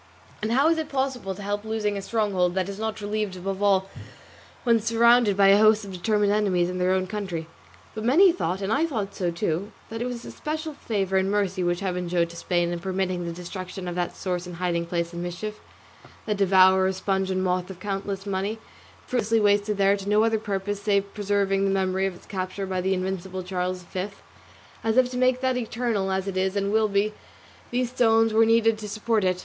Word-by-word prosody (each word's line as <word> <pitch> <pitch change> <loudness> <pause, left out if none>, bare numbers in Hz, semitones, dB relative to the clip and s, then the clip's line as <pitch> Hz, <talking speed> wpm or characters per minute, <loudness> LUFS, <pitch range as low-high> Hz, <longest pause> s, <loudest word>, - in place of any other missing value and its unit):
And 215 +2 -1
how 275 +5 +4
is 330 -1 +2
it 315 - -4
possible 265 -8 -2
to 205 - -9
help 205 +1 -2
losing 220 -2 -1
a 200 - -3
stronghold 195 -4 0
that 190 -1 0
is 200 0 -6
not 220 -1 -3
relieved, 210 -1 -2
above 195 +2 -4
all 195 -2 +3 0.8
when 235 -2 +4
surrounded 230 -1 +4
by 195 -1 +6
a 200 +1 +7
host 215 0 +5
of 195 - -8
determined 205 +3 +1
enemies 185 -4 +1
in 180 - -4
their 180 +1 +2
own 185 0 +1
country? 185 -5 -4 0.5
But 215 - -5
many 340 - +6
thought, 190 - -2
and 200 +3 0
I 315 +6 +2
thought 210 -9 -3
so 180 -2 -1
too, 170 +3 -2 0.2
that 225 +1 -5
it 245 - -1
was 245 -2 -5
special 310 +1 -4
favour 195 -7 -1
and 190 0 +1
mercy 195 -2 0
which 175 +1 0
Heaven 180 -2 -2
showed 170 -1 +1
to - - -12
Spain 175 0 0
in 175 - -3
permitting 185 -1 -2
the 170 - -3
destruction 180 +2 -7
of 175 - -3
that 175 0 -2
source 180 -1 -3
and 175 - -7
hiding 170 -1 -1
place 170 0 -2
of 170 - -5
mischief, 175 +5 -5 0.7
that 210 -2 -1
devourer, 190 -1 +5
sponge, 190 0 -1
and 185 0 0
moth 180 0 0
of 185 -2 -9
countless 195 0 -4
money, 200 +2 -2 0.5
fruitlessly 230 -2 +1
wasted 205 0 +2
there 200 0 +4
to 200 0 -6
no 210 +1 +4
other 225 -1 +2
purpose 205 -1 -3
save 200 -1 0
preserving 200 -1 +1
the 195 - +2
memory 190 0 +1
of 190 - -5
its - - -16
capture 190 0 -4
by 185 -1 -2
the 190 +1 +1
invincible 185 0 -4
Charles 180 0 -3
V; 185 +2 -4 0.8
as 225 +1 +1
if 255 -1 +4
to 250 - -4
make 255 0 +2
that 260 -1 +1
eternal, 225 -4 -1
as 190 0 -1
it 190 -1 -3
is 190 +1 0
and 200 0 0
will 220 0 +3
be, 205 +1 +1 0.6
these 245 0 -1
stones 225 -2 +3
were 225 +1 +5
needed 225 -1 +3
to 210 -1 -6
support 215 0 0
it. 185 -1 +1
200 Hz, 215 wpm, -25 LUFS, 185-220 Hz, 0.8 s, a